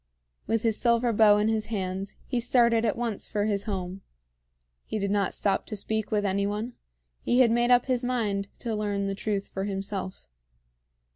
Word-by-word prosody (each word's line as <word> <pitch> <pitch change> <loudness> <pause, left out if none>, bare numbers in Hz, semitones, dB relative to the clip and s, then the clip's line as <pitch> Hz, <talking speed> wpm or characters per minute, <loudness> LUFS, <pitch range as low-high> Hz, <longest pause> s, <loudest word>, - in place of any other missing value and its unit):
With 225 -1 0
his 225 -2 +1
silver 235 0 +2
bow 210 -1 +6
in 210 +1 +2
his 220 -1 0
hands 190 -2 -3
he 250 - -1
started 235 -1 +3
at 215 - +1
once 230 -4 -3
for 205 -1 0
his 205 -2 -1
home. 190 -2 -4 0.8
He - - -4
did 200 -1 -1
not 200 -2 +1
stop 200 - 0
to 215 - -4
speak 220 +1 -2
with 210 -2 0
any 200 +1 +1
one; 215 +4 -3 0.5
he 245 +2 +3
had 235 -3 +5
made 240 +1 +2
up 245 -1 +5
his 255 -2 0
mind 215 -6 -1
to 230 - -2
learn 205 -1 -1
the 195 - -1
truth 200 0 -3
for 195 0 -3
himself. 195 -1 -4
210 Hz, 190 wpm, -27 LUFS, 200-230 Hz, 0.8 s, bow